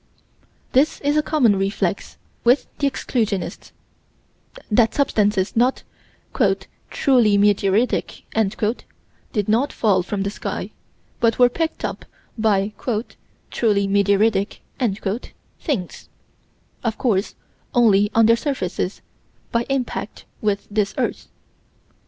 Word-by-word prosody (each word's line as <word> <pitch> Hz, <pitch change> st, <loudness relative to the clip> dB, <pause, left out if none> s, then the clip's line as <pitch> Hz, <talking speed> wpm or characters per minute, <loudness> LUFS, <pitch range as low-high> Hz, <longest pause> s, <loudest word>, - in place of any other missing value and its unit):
This 275 Hz, +4 st, +3 dB
is 290 Hz, +1 st, +1 dB
a 305 Hz, -, +4 dB
common 255 Hz, -10 st, +3 dB
reflex 195 Hz, +1 st, -2 dB, 0.3 s
with 245 Hz, +4 st, +4 dB
the 280 Hz, -, +2 dB
exclusionists: 215 Hz, -8 st, -3 dB, 1.0 s
that 225 Hz, +1 st, +3 dB
substances 210 Hz, -8 st, +1 dB
not 245 Hz, +3 st, +2 dB, 1.1 s
"truly 240 Hz, -7 st, +3 dB
meteoritic" 210 Hz, +1 st, 0 dB, 0.5 s
did 210 Hz, -3 st, -1 dB
not 235 Hz, +7 st, +2 dB
fall 200 Hz, -5 st, +2 dB
from 195 Hz, +2 st, -3 dB
the 200 Hz, -, -2 dB
sky, -, -, -5 dB, 0.5 s
but 230 Hz, -1 st, +2 dB
were 245 Hz, -1 st, +6 dB
picked 325 Hz, +5 st, -2 dB
up -, -, -5 dB, 0.3 s
by 210 Hz, -2 st, +1 dB, 0.8 s
"truly 205 Hz, -4 st, +1 dB
meteoritic" 200 Hz, +1 st, +2 dB, 1.0 s
things, 220 Hz, -, -4 dB, 0.7 s
of 225 Hz, -3 st, -1 dB
course 210 Hz, -5 st, 0 dB, 0.4 s
only 205 Hz, -4 st, +5 dB
on 225 Hz, 0 st, +6 dB
their 230 Hz, +1 st, +6 dB
surfaces, 195 Hz, -, -3 dB, 0.5 s
by 235 Hz, 0 st, 0 dB
impact 255 Hz, -5 st, -3 dB, 0.2 s
with 205 Hz, -2 st, -1 dB
this 205 Hz, -1 st, 0 dB
earth. -, -, -2 dB
215 Hz, 105 wpm, -21 LUFS, 200-245 Hz, 1.1 s, were